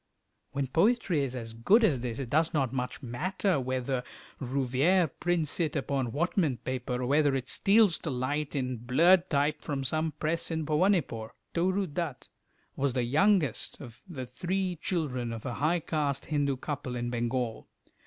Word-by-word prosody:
When 140 Hz, -1 st, 0 dB
poetry 175 Hz, -, +2 dB
is 130 Hz, -2 st, -3 dB
as 115 Hz, -2 st, -6 dB
good 190 Hz, -, +4 dB
as 150 Hz, -, +3 dB
this 120 Hz, -1 st, -4 dB
it 130 Hz, -4 st, -5 dB
does 160 Hz, +2 st, +2 dB
not 135 Hz, -4 st, +1 dB
much 125 Hz, +2 st, -3 dB
matter 180 Hz, -, 0 dB
whether 130 Hz, 0 st, -1 dB, 0.4 s
Rouveyre 135 Hz, +6 st, +2 dB
prints 175 Hz, -3 st, 0 dB
it 160 Hz, -3 st, 0 dB
upon 135 Hz, -4 st, -1 dB
Whatman 160 Hz, -, +1 dB
paper, 125 Hz, +1 st, -3 dB
or -, -, 0 dB
whether 145 Hz, +1 st, +3 dB
it 130 Hz, -1 st, -3 dB
steals 200 Hz, 0 st, +4 dB
to 160 Hz, -, -4 dB
light 145 Hz, +4 st, -2 dB
in 130 Hz, -2 st, -1 dB
blurred 170 Hz, +10 st, +4 dB
type 145 Hz, 0 st, +1 dB
from 140 Hz, -2 st, -3 dB
some 155 Hz, +4 st, -1 dB
press 160 Hz, +2 st, -2 dB
in 160 Hz, -2 st, -2 dB
Bhowanipore. 150 Hz, -, +1 dB, 0.2 s
Toru 185 Hz, +3 st, +1 dB
Dutt 160 Hz, -4 st, -4 dB, 0.5 s
was 140 Hz, -2 st, 0 dB
the 125 Hz, -1 st, +1 dB
youngest 155 Hz, -, +2 dB
of 120 Hz, -4 st, -11 dB
the 135 Hz, -8 st, -6 dB
three 180 Hz, +7 st, -2 dB
children 130 Hz, -9 st, -1 dB
of 115 Hz, -1 st, -6 dB
a 125 Hz, -, -2 dB
high 155 Hz, +7 st, +1 dB
caste 145 Hz, -4 st, -1 dB
Hindu 145 Hz, -3 st, 0 dB
couple 135 Hz, -2 st, -4 dB
in 120 Hz, 0 st, -2 dB
Bengal. 120 Hz, -1 st, -2 dB
140 Hz, 165 wpm, -29 LUFS, 125-170 Hz, 0.5 s, good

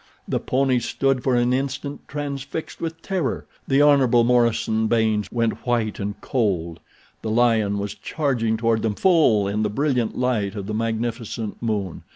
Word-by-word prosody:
The -, -, 0 dB
ponies 130 Hz, -2 st, +1 dB
stood 135 Hz, -2 st, 0 dB
for 130 Hz, -2 st, +2 dB
an 120 Hz, +1 st, +2 dB
instant 140 Hz, +2 st, -3 dB
transfixed 140 Hz, +1 st, -5 dB
with 165 Hz, 0 st, -5 dB
terror. 185 Hz, -8 st, -2 dB, 0.2 s
The 140 Hz, +1 st, +4 dB
Hon. 130 Hz, -5 st, +5 dB
Morison 115 Hz, -2 st, +2 dB
Baynes 110 Hz, -2 st, +1 dB
went 115 Hz, -2 st, -1 dB
white 115 Hz, -3 st, 0 dB
and 100 Hz, 0 st, -4 dB
cold. 90 Hz, -9 st, -1 dB, 0.4 s
The 110 Hz, -, -4 dB
lion 110 Hz, -3 st, +2 dB
was 100 Hz, 0 st, -3 dB
charging 120 Hz, -8 st, -1 dB
toward 115 Hz, -1 st, +1 dB
them 110 Hz, -2 st, -1 dB
full 140 Hz, -, +4 dB
in 105 Hz, +2 st, -1 dB
the 105 Hz, -, +1 dB
brilliant 125 Hz, -1 st, 0 dB
light 115 Hz, -6 st, 0 dB
of 100 Hz, -2 st, -5 dB
the 105 Hz, -, -4 dB
magnificent 115 Hz, 0 st, -3 dB
moon. 105 Hz, -6 st, -2 dB
115 Hz, 160 wpm, -23 LUFS, 110-135 Hz, 0.4 s, Hon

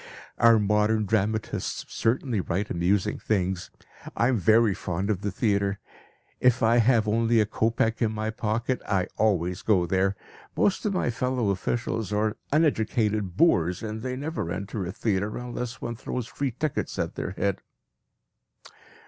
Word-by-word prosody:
Our 115 Hz, -1 st, +7 dB
modern 105 Hz, +1 st, +2 dB
dramatists 110 Hz, +1 st, -1 dB
certainly 115 Hz, -2 st, 0 dB
write 95 Hz, +4 st, -2 dB
amusing 90 Hz, +3 st, +1 dB
things. 95 Hz, -3 st, -1 dB, 0.5 s
I 120 Hz, -, +3 dB
am 130 Hz, -, +2 dB
very 110 Hz, +3 st, +4 dB
fond 95 Hz, +3 st, -2 dB
of 100 Hz, -3 st, -2 dB
the 105 Hz, -, -1 dB
theatre. 100 Hz, -2 st, 0 dB, 0.6 s
If 125 Hz, -1 st, +3 dB
I 115 Hz, +2 st, +4 dB
have 115 Hz, -2 st, +4 dB
only 115 Hz, +2 st, +3 dB
a 105 Hz, -, +4 dB
kopeck 115 Hz, +2 st, 0 dB
in 110 Hz, -2 st, +2 dB
my 110 Hz, 0 st, -2 dB
pocket, 115 Hz, +3 st, -1 dB
I 95 Hz, -3 st, +1 dB
always 90 Hz, -4 st, +1 dB
go 95 Hz, -5 st, +2 dB
there. 95 Hz, +2 st, +1 dB, 0.4 s
Most 205 Hz, +1 st, +2 dB
of 200 Hz, -, 0 dB
my 125 Hz, -, +1 dB
fellow 120 Hz, -2 st, 0 dB
officials 110 Hz, +2 st, -2 dB
are 105 Hz, +1 st, 0 dB, 0.2 s
uneducated 110 Hz, -, +1 dB
boors, 90 Hz, -, +3 dB
and 110 Hz, 0 st, -4 dB, 0.2 s
never 150 Hz, -, -3 dB
enter 100 Hz, +1 st, -4 dB
a -, -, -3 dB
theatre 100 Hz, 0 st, -1 dB
unless 125 Hz, 0 st, -5 dB
one 120 Hz, 0 st, -4 dB
throws 125 Hz, -1 st, -4 dB
free 140 Hz, +4 st, -3 dB
tickets 140 Hz, +5 st, -3 dB
at -, -, -2 dB
their 95 Hz, -, -4 dB
head. 100 Hz, -2 st, 0 dB
110 Hz, 150 wpm, -26 LUFS, 100-115 Hz, 0.6 s, Our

